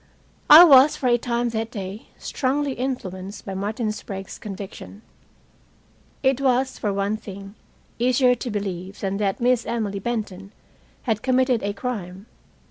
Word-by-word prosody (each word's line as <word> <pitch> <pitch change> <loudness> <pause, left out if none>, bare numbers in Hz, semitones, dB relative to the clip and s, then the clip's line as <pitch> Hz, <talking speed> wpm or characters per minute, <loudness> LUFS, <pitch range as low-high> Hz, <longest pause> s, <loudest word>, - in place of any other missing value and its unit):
I 310 +3 +12
was, 280 -3 +7
for - - -6
a 240 - +4
time 240 0 -1
that 225 0 -3
day, 200 -2 -7
strongly 280 +2 -1
influenced 205 -7 -5
by 195 - -5
Martin 215 +3 -2
Sprague's 195 -2 -7
conviction. 200 +1 -9 1.2
It 265 0 +2
was, 260 0 +1
for 205 - -1
one 200 +2 -1
thing, 195 -1 -10 0.5
easier 250 +1 +4
to 245 - -5
believe 195 -3 -5
than 195 0 -2
that 200 +1 -1 0.3
Emily 210 -4 -2
Benton 200 -3 -4 0.5
had 220 -4 -1
committed 255 -2 +2
a 200 0 -2
crime. 200 -4 -5
215 Hz, 135 wpm, -23 LUFS, 195-250 Hz, 1.2 s, I